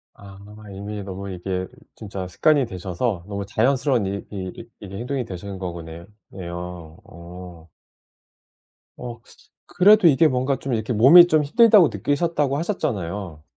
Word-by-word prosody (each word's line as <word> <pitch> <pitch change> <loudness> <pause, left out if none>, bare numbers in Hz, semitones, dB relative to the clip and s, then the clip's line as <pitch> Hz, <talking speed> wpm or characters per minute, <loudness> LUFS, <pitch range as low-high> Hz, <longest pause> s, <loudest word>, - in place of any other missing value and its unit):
아 100 -1 -13 0.4
이미 100 +2 -6
너무 100 0 -7
이게 90 0 -4 0.3
진짜 95 -3 -7
습관이 145 - +2
되셔서 95 0 -4
너무 100 -1 -4
자연스러운 125 +1 +1
이 100 +1 -4
이 95 -3 -7
이게 100 -1 -9
행동이 125 +2 -3
되시는 95 -1 -8
거구네 85 -2 -8 0.3
네요. 85 -3 -8
어. 85 0 -12 1.3
어 120 -2 -8 0.5
그래도 205 0 +5
이게 155 +2 +4
뭔가 130 +1 0
좀 135 - -5
이렇게 110 +2 -2
몸이 150 +11 +8
좀 155 -2 +2
힘들다고 205 +3 +5
느끼셨다고 145 - -1
하셨잖아요. 100 - -4
100 Hz, 295 characters per minute, -22 LUFS, 90-135 Hz, 1.3 s, 몸이